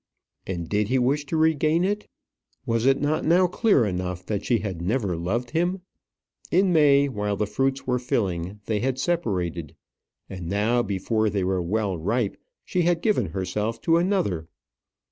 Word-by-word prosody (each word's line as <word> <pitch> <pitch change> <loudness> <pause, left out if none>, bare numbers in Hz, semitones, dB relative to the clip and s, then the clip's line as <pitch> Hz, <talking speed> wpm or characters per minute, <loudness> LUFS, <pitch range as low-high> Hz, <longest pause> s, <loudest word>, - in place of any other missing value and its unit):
And 85 -3 -4
did 105 +2 0
he 130 - +1
wish 140 +4 +1
to 160 - -1
regain 160 +1 +2
it? 205 +2 -1 0.6
Was 115 +2 +1
it 135 0 +4
not 155 +3 0
now 175 +3 +4
clear 180 - +3
enough 90 -2 -3
that 105 -2 -2
she 120 - +2
had 95 -6 -4
never 100 -1 0
loved 110 +9 -2
him? 175 +3 0 0.7
In 185 0 +3
May, 140 -3 +5
while 105 -5 -2
the 105 - 0
fruits 135 +6 -1
were 125 -1 0
filling, 95 -5 -2
they 110 -2 0
had 130 +2 -1
separated; 90 - -2 0.5
and 90 -3 -7
now 110 +5 +2
before 110 +1 0
they 100 -2 -1
were 95 0 0
well 95 0 -1
ripe 105 +5 0 0.3
she 180 - 0
had 170 0 +1
given 215 - +2
herself 100 +6 -3
to 165 0 +3
another! 170 - 0
115 Hz, 165 wpm, -25 LUFS, 95-150 Hz, 0.7 s, May